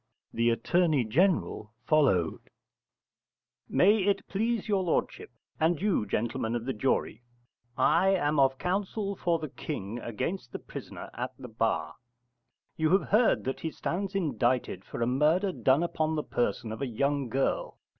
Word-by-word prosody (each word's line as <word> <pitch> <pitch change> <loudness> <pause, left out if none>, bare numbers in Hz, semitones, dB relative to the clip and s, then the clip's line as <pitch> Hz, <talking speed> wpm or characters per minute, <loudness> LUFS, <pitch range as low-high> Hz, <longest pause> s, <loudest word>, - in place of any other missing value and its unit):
The 115 +1 +2
Attorney 155 +3 +2
General 140 - +1
followed: 125 - +2 1.2
May 205 +4 +5
it 200 0 0
please 225 +2 -1
your 200 -3 +2
lordship, 175 -3 -1 0.3
and 160 0 +2
you 190 - +1
gentlemen 115 +2 -1
of 120 -1 -3
the 135 - -1
jury, 120 -1 -1 0.6
I 170 +8 +4
am 155 -6 +2
of 135 -1 +4
counsel 195 +3 -2
for 170 -2 +1
the 155 -2 -6
King 120 -6 -5
against 120 - -4
the - - -2
prisoner - - -9
at - - -4
the - - -9
bar. - - -1 0.8
You 155 -1 +2
have - - -8
heard 225 +4 +3
that 130 - -3
he 160 - -3
stands 195 +5 -3
indicted 125 - 0
for - - -3
a - - +2
murder 155 - +2
done 140 -2 +2
upon 160 -2 -1
the 150 - -1
person 115 -1 -1
of 110 - -6
a 135 - -1
young 140 +2 -1
girl. 135 +3 -1
150 Hz, 155 wpm, -29 LUFS, 120-185 Hz, 1.2 s, May